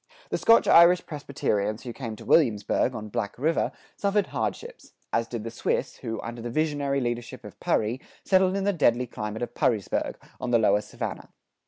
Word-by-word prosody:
The - - 0
Scotch 230 - +5
Irish 175 +2 +7
Presbyterians 110 - -2
who 120 - -6
came 115 -3 -6
to - - -12
Williamsburg, 120 -3 +2
on 110 -1 -6
Black 105 -2 -3
River, 160 +6 +1 0.2
suffered 200 0 +1
hardships; - - -5 0.2
as 115 - +1
did 115 -3 -5
the 115 - -5
Swiss 115 - -2
who, 115 -1 -5
under 120 0 -6
the 120 - -4
visionary 145 0 0
leadership 120 -2 -4
of - - -11
Purry, 115 +5 0 0.2
settled 190 0 +3
in 195 - -1
the 200 +1 +2
deadly 125 -7 +2
climate 110 -1 -5
of 120 0 -5
Purrysburg, 110 -6 0 0.2
on - - -3
the 120 - +5
lower 105 -2 +3
Savannah. - - -6
120 Hz, 180 wpm, -26 LUFS, 110-155 Hz, 0.2 s, Irish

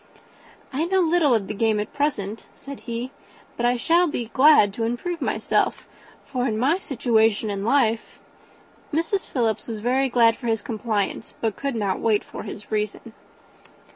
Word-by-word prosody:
"I 300 +5 0
know 380 +2 +2
little 325 -6 +3
of 210 -3 0
the 210 - -5
game 215 0 +1
at 210 - -4
present," 225 -8 -2
said 280 -1 -9
he, 235 +3 -3 0.4
"but 240 - +1
I 245 0 +2
shall 340 +7 +3
be 240 -7 -4
glad 265 -8 +6
to 225 - -3
improve 285 +10 -3
myself; - - 0 0.4
for 255 -2 -2
in 215 -3 -1
my 280 +10 +2
situation 225 - +1
of 200 - -3
life 225 +1 +1 0.4
" - - -30
Mrs. 335 +6 -1
Philips 230 -5 -1
was 225 -2 -4
very 260 +4 +1
thankful 230 -2 +4
for 240 - -5
his 225 -2 0
compliance, 215 -2 -3
but 220 -3 -1
could 275 -3 -3
not 200 -4 -1
wait 215 -2 +2
for - - -8
his 210 - -9
reason. 215 +1 -3
235 Hz, 170 wpm, -23 LUFS, 220-280 Hz, 0.4 s, glad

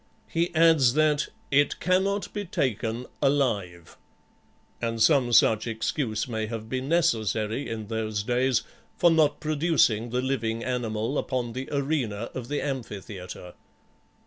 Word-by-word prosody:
He 170 +1 0
adds 160 -6 +5
that 155 -1 +2 0.2
"it 145 +1 +3
cannot 195 +2 0
be 205 - -3
taken 120 - -2 0.2
alive;" 105 - 0 0.8
and 115 -1 -2
some 130 -1 +4
such 110 -1 +4
excuse 110 0 -2
may 110 -2 -3
have 110 -1 -6
been 130 +3 -3
necessary 115 - +1
in 110 -1 -4
those 110 -1 -2
days 125 +2 +1 0.3
for 175 -2 +5
not 155 -3 +3
producing 150 -7 +2
the 125 +2 -1
living 115 -4 -1
animal 120 0 -2
upon 125 -3 -2
the 130 +2 -5
arena 135 -7 -1
of 125 -2 -6
the 145 +2 -2
amphitheatre. 100 -9 -6
125 Hz, 130 wpm, -26 LUFS, 110-145 Hz, 0.8 s, adds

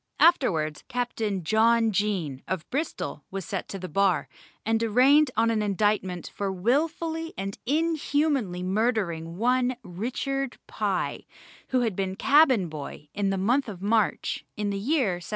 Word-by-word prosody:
Afterwards 165 - +3
Captain 225 -6 -2
John 225 +5 +3
Jaen, 185 -10 -1
of 185 -4 -3
Bristol, 300 +5 -3
was 195 -2 -5
set - - -4
to 195 - -5
the 185 -1 -6
bar, 190 +2 +2 0.4
and 225 +1 +1
arraigned 260 +6 +5
on 230 +1 +3
an 220 -1 +1
indictment 200 -3 0
for 200 -1 -2
wilfully 320 - -1
and 195 +1 -4
inhumanly 290 - +1
murdering 185 -5 -1
one 250 +3 +2
Richard 255 +7 -3
Pye, - - -2 0.4
who 255 -1 +1
had 225 -5 0
been 190 0 -2
cabin 270 - +4
boy, 150 -1 -8
in 200 -1 0
the 195 - 0
month 240 +7 +1
of 190 -2 -8
March, 215 0 +1
in 205 -1 -1
the 200 - -2
year 240 - +1
1724. - - -10
215 Hz, 150 wpm, -26 LUFS, 190-260 Hz, 0.4 s, arraigned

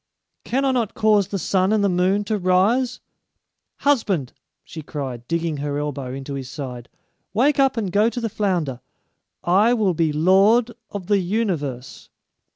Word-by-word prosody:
can 270 +3 0
I 270 - +3
not 240 -5 -1
cause 210 -3 +3
the 200 - -3
sun 190 +1 +1
and 215 -1 +2
the - - +4
moon 185 +2 +1
to 210 0 -2
rise? 205 +8 +2 0.8
Husband!" 205 - +1 0.3
she 160 - -9
cried, 130 -5 -6
digging 165 -2 -1
her 145 0 -3
elbow 145 -3 -4
into 135 +2 -6
his 135 -2 -6
side, 130 -4 -7 0.5
"wake 275 +6 +3
up 270 -2 +3
and 205 -5 -2
go 210 +4 +3
to 245 - -5
the 230 - -2
flounder. 180 - -1 0.6
I 205 +7 +4
will 205 -5 +1
be 160 -1 +1
lord 195 +9 +4 0.2
of 200 -3 -6
the 200 +1 +2
universe." 175 - -3
185 Hz, 160 wpm, -22 LUFS, 150-220 Hz, 0.8 s, the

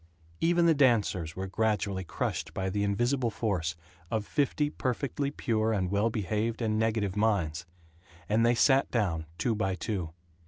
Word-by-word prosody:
Even 170 +1 +3
the 165 - +6
dancers 105 - +2
were 95 - -3
gradually 100 -1 0
crushed 85 - -3
by 95 0 -1
the 100 +1 0
invisible 120 +5 +1
force 90 -8 -1 0.3
of 110 -2 -1
fifty 145 +2 0
perfectly 140 +2 -2
pure 115 -6 0
and 95 -3 -1
well 100 +3 +2
behaved 110 +1 -1
and 110 -2 0
negative 110 -3 0
minds; 90 -6 0 0.6
and 110 +2 +2
they 120 +1 +4
sat 135 +3 +4
down, 85 -9 -1
two 120 - +1
by 95 -3 -1
two. 95 -2 -3
110 Hz, 155 wpm, -29 LUFS, 95-120 Hz, 0.6 s, the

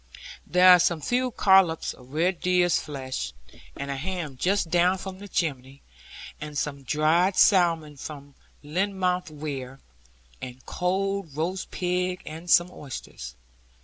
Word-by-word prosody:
There 180 +1 +5
are 180 -1 +9
some 170 -1 +2
few 250 - 0
collops 190 -7 +3
of 125 +1 -17
red 170 +3 +1
deer's 180 -1 +2
flesh, 130 - -5 0.4
and 140 0 -4
a - - -2
ham 165 -2 -4
just 180 +4 0
down 180 +2 +3
from 190 0 -8
the 205 - -9
chimney, 140 -7 -3 0.6
and 150 -1 -6
some 140 0 -3
dried 155 +7 +2
salmon 165 -6 +3
from 140 0 -9 0.3
Lynmouth 180 +2 -1
weir, 140 -3 -6 0.6
and 130 0 -9
cold 190 -3 -2
roast 180 +4 -2
pig, 180 0 -2
and 160 +3 -8
some 175 +1 +5
oysters. 130 - -8
170 Hz, 135 wpm, -26 LUFS, 145-185 Hz, 0.6 s, are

